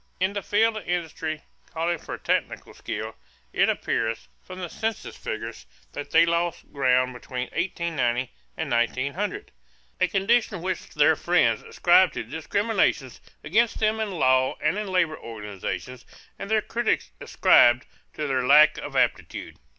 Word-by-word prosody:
In 190 +2 +1
the 200 - -3
field 220 +3 +2
of 215 - -8
industry 160 -3 -3 0.3
calling 170 +1 -1
for - - -7
technical - - -2
skill, - - -6 0.4
it - - +3
appears, 115 0 -2
from 185 - -10
the 180 -1 -4
census 220 +5 -4
figures, - - -6 0.3
that 145 0 -6
they 165 +2 +5
lost 170 0 -2
ground 130 -2 +2
between 125 +1 -5
1890 160 -8 -1 0.3
and - - -3
1900 140 - -1 0.5
a 185 - +3
condition 195 0 +1
which 185 -1 -3
their 150 +1 +5
friends 130 -11 +2
ascribed 175 -1 +3
to - - -3
discriminations 160 - -1 0.2
against 225 +7 +2
them 220 0 +1
in 220 -1 -1
law 130 -7 +2
and 155 +7 0
in 210 - -4
labor 180 -4 0
organizations 110 +3 -6 0.4
and 200 - -6
their 220 -1 +2
critics 225 - -1
ascribed 120 +1 +5 0.3
to 150 - -3
their 130 -3 0
lack 150 +3 +6
of - - -7
aptitude. - - -1
165 Hz, 145 wpm, -25 LUFS, 130-195 Hz, 0.5 s, lack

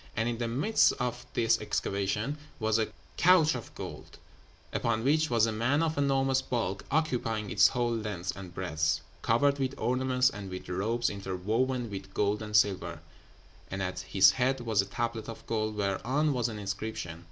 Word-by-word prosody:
And 110 +1 0
in 120 -1 -2
the 120 - -1
midst 145 - +3
of 125 -1 -4
this 115 -1 +3
excavation 105 +7 -1 0.2
was 110 0 +2
a 110 - +1 0.3
couch 170 -3 +5
of 120 -4 -6
gold, - - -8 0.6
upon 115 -1 0
which 155 +4 +3
was 115 -2 +4
a 115 - -1
man 125 +8 +1
of 160 -1 0
enormous 135 -1 +2
bulk, 105 -8 -2
occupying 120 -8 0
its - - +6
whole 120 -2 0
length 105 -5 -3
and 95 -3 -9
breadth, 80 -4 -1 0.2
covered 140 +5 +2
with 135 0 -1
ornaments 130 +1 +2
and 100 -5 -7
with 90 0 -7
robes 110 +7 0
interwoven 110 +6 -1
with 95 0 -7
gold 105 +1 +1
and 105 -1 -4
silver; 95 -5 +2 0.7
and 95 +1 -3
at 90 0 -3
his 95 +1 +5
head 130 0 0
was 110 -4 +2
a - - -5
tablet 115 +1 -3
of 115 - -9
gold, 110 -1 -1
whereon 120 +10 0
was 120 -2 0
an 110 - -6
inscription. 100 -4 -4
115 Hz, 175 wpm, -30 LUFS, 100-130 Hz, 0.7 s, its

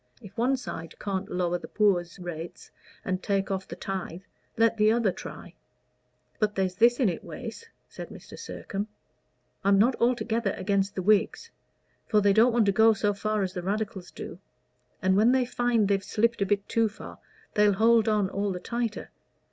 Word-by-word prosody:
If 200 -1 -13
one 255 +4 +2
side 165 -9 -7
can't 195 -1 -3
lower 175 -1 -1
the - - -9
poor's 185 -5 +1
rates 175 -2 -8 0.3
and 185 0 -1
take 195 0 -1
off 190 0 -3
the - - -7
tithe, 190 -2 -5 0.3
let 230 0 +4
the 215 0 +4
other 225 -4 +2
try." - - -9 0.9
"But 210 -2 0
there's 190 -1 0
this 235 +6 +4
in 250 - +3
it, 175 - -2
Wace," 460 - -8 0.2
said - - -9
Mr. - - -11
Sircome. 200 +1 -5 0.8
"I'm 200 0 +4
not 235 +6 +4
altogether 230 -3 +1
against 195 +1 0
the 185 - -2
Whigs. 215 - +2 0.6
For 215 - +3
they 200 -1 +4
don't 230 +4 +5
want 235 -2 +3
to 200 - +4
go 220 +3 +5
so 205 0 0
far 215 +1 -1
as 185 -1 -3
the 180 - -4
Radicals 195 -1 -3
do, - - -9 0.6
and 190 0 +3
when 220 +5 +5
they 260 -1 +3
find 240 -3 +1
they've 195 -1 +1
slipped 230 +2 0
a 200 - +2
bit 200 0 0
too 225 -1 +2
far 210 - -11 0.3
they'll 210 -1 +4
hold 225 +2 +4
on 210 -2 +2
all 200 +1 -2
the 180 - -4
tighter. 230 +3 -4
205 Hz, 185 wpm, -27 LUFS, 190-225 Hz, 0.9 s, don't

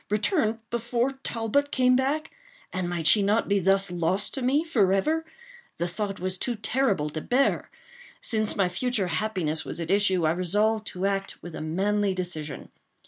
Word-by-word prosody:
—return 220 - +1
before 235 +2 0
Talbot 235 +5 0
came 255 -1 +4
back—and 310 - -3
might 170 -2 -3
she 205 +7 +7
not 210 +3 +2
be 200 0 +2
thus 195 0 +3
lost 175 +3 -1
to 270 - -3
me 270 +5 +2
forever? 260 - +2 0.5
The 175 - -1
thought 195 +2 -3
was 185 0 -3
too 245 - -2
terrible 205 - 0
to 155 - -4
bear. 265 - +1 0.5
Since 215 -2 +1
my 195 -3 +2
future 205 +3 -1
happiness 170 -4 -1
was - - -6
at 170 +1 -3
issue, 190 -4 +3
I 155 - +3
resolved 210 +5 +1
to 185 +1 -3
act 195 0 -2
with 175 - -8
a - - -6
manly 195 +5 0
decision. 175 -5 -5
200 Hz, 165 wpm, -26 LUFS, 180-240 Hz, 0.5 s, she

